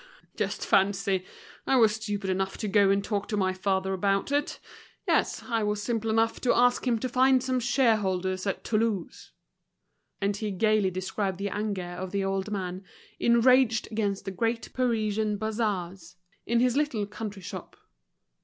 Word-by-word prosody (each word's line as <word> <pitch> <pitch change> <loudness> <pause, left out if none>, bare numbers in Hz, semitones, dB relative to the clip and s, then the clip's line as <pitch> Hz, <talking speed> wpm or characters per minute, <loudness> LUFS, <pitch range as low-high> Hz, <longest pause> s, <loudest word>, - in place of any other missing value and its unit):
"Just - - -2
fancy. 195 -1 +2 0.4
I 270 - +3
was 225 -4 +5
stupid 205 -3 -3
enough 190 +1 -2
to 215 - -3
go 200 0 +4
and 200 0 +2
talk 205 -1 -2
to 210 - -2
my 190 -2 +1
father 190 0 -1
about 195 +5 0
it. 290 +1 0 0.5
Yes, - - +1
I 230 -3 -1
was 210 0 -1
simple 225 -1 -1
enough 225 +1 +1
to 250 - +2
ask 245 +1 +3
him 235 -2 +2
to 255 - -2
find 255 +1 +3
some 260 -1 0
shareholders 205 -7 +1
at 195 - -2
Toulouse." 215 -5 -2 0.9
And 200 0 0
he 210 +1 -3
gaily 210 0 +2
described 185 +1 -3
the 200 +1 -2
anger 205 -3 -2
of 175 +1 -6
the 200 +1 -1
old 195 +1 -1
man, 185 -2 -4 0.4
enraged 235 -1 +4
against 205 -3 -2
the 195 - -3
great 230 +4 -2
Parisian 220 -4 0
bazaars, 195 -5 -3 0.3
in 235 +1 +2
his 250 0 +2
little 280 -8 0
country 205 -1 -7
shop. - - -8
210 Hz, 165 wpm, -27 LUFS, 195-230 Hz, 0.9 s, was